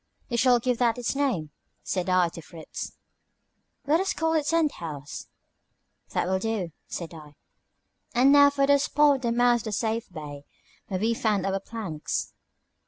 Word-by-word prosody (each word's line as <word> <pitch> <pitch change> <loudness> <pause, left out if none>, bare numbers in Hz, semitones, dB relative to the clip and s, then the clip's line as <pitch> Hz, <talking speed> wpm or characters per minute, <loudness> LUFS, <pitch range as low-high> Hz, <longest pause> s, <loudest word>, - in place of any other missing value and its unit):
You 240 - -1
shall 245 0 +5
give 245 0 -1
that 235 -2 +2
its 245 +2 -2
name," 240 - 0 0.3
said 185 -1 -2
I 185 -2 +3
to 165 - -10
Fritz. 160 +1 -8 0.9
"Let 305 +4 +3
us 385 +1 0
call 325 0 +1
it 305 -2 +1
Tent 325 -1 +2
House." 145 -4 -7 0.8
"That - - 0
will 190 +1 0
do," 205 -5 -2 0.2
said 170 -1 -6
I. 150 -2 -12 0.8
"And 260 +3 +6
now 285 0 +8
for 280 -1 +1
the 280 0 +5
spot 290 0 +3
at - - -12
the 235 -2 0
mouth 240 -1 +3
of 210 - -1
Safe 225 -2 -2
Bay, 145 -4 -8 0.4
where 185 - -2
we 225 +3 +1
found 210 -4 0
our 195 0 0
planks?" 195 -8 -4
225 Hz, 170 wpm, -26 LUFS, 180-275 Hz, 0.9 s, now